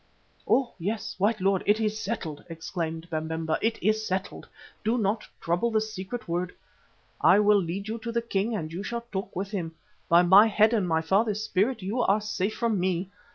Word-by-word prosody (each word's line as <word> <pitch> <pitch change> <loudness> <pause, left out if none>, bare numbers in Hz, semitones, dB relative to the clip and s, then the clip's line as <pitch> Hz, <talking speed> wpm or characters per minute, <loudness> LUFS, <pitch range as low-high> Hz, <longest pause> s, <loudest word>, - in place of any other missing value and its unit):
"Oh! 260 -3 +2
yes, 205 +5 -3
white 215 +3 +2
lord, 195 0 +2
it 210 +2 +4
is 215 -1 -1
settled," 190 -10 -4
exclaimed 165 0 -4
Babemba, 160 0 -2
"it 225 +1 +1
is 215 +2 +2
settled. 190 -1 -3 0.4
Do 225 +3 +1
not 215 0 0
trouble 175 +8 0
the 220 -1 +2
secret 215 +2 -5
word. 175 +1 -2 0.7
I - - +6
will 210 -1 +5
lead 190 +4 -4
you 225 +2 -4
to 235 +1 -5
the 235 0 -1
king 220 0 -1
and 160 -5 -4
you 180 - -4
shall 235 +3 -4
talk 195 0 -4
with 195 +2 -3
him. 165 -6 -4 0.3
By 170 +1 +6
my 195 +5 +8
head 215 +1 +4
and 205 -5 +1
my 160 -1 +2
father's 205 +5 +1
spirit 215 +2 0
you 215 +7 -1
are 205 -2 +3
safe 210 -1 -2
from 230 -4 0
me. 185 +1 -1
200 Hz, 195 wpm, -27 LUFS, 175-220 Hz, 0.7 s, my